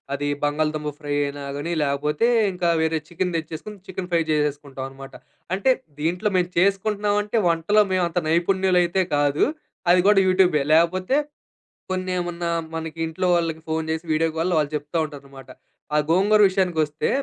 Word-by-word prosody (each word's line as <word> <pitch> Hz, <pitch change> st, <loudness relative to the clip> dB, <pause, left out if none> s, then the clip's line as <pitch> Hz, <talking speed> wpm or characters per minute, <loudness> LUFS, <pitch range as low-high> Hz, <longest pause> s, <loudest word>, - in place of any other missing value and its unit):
అది 145 Hz, +1 st, -3 dB, 0.2 s
బంగాళదుంప 150 Hz, 0 st, -1 dB
ఫ్రై 145 Hz, -1 st, -4 dB
అయినా 140 Hz, 0 st, -6 dB
గాని 165 Hz, +4 st, -3 dB
లేకపోతే 150 Hz, +10 st, 0 dB, 0.3 s
ఇంకా 175 Hz, -1 st, 0 dB
వేరే 160 Hz, 0 st, +1 dB
చికెన్ 180 Hz, +1 st, -2 dB
తెచ్చేసుకొని 160 Hz, +6 st, -7 dB
చికెన్ 185 Hz, -1 st, -5 dB
ఫ్రై 165 Hz, -, +4 dB
చేసేసుకుంటామన్నమాట. 135 Hz, -2 st, -3 dB, 0.4 s
అంటే 230 Hz, +7 st, +2 dB, 0.3 s
దీంట్లో 180 Hz, +6 st, 0 dB
మేము 180 Hz, 0 st, 0 dB
చేసుకుంటున్నామంటే 205 Hz, +3 st, +1 dB
వంటలో 185 Hz, +6 st, +3 dB
మేము 185 Hz, -1 st, +2 dB
అంత 180 Hz, -, 0 dB
నైపుణ్యులు 185 Hz, +2 st, +2 dB
అయితే 185 Hz, +2 st, +1 dB
కాదు. 145 Hz, 0 st, +2 dB, 0.5 s
అది 180 Hz, -, +5 dB
గూడా 200 Hz, -2 st, +6 dB
యూట్యూబే 185 Hz, -5 st, +3 dB
లేకపోతే 185 Hz, -, +2 dB, 0.8 s
కొన్ని 185 Hz, 0 st, -2 dB
ఏమన్నా 175 Hz, -1 st, -3 dB, 0.3 s
మనకి 160 Hz, 0 st, -6 dB
ఇంట్లో 160 Hz, +3 st, -2 dB
వాళ్ళకి 165 Hz, -2 st, -1 dB
ఫోన్ 160 Hz, 0 st, -2 dB
జేసి 160 Hz, +1 st, -2 dB
వీడియో 165 Hz, +1 st, +2 dB
కాల్‌లో 170 Hz, +2 st, 0 dB
వాళ్ళు 150 Hz, -1 st, 0 dB
చెప్తా 150 Hz, +3 st, -5 dB
ఉంటారన్నమాట. 140 Hz, -3 st, -11 dB, 0.5 s
ఆ -, -, +4 dB
గోంగూర 200 Hz, +5 st, +4 dB
విషయానికొస్తే 165 Hz, -6 st, 0 dB
165 Hz, 145 wpm, -23 LUFS, 150-185 Hz, 0.8 s, గూడా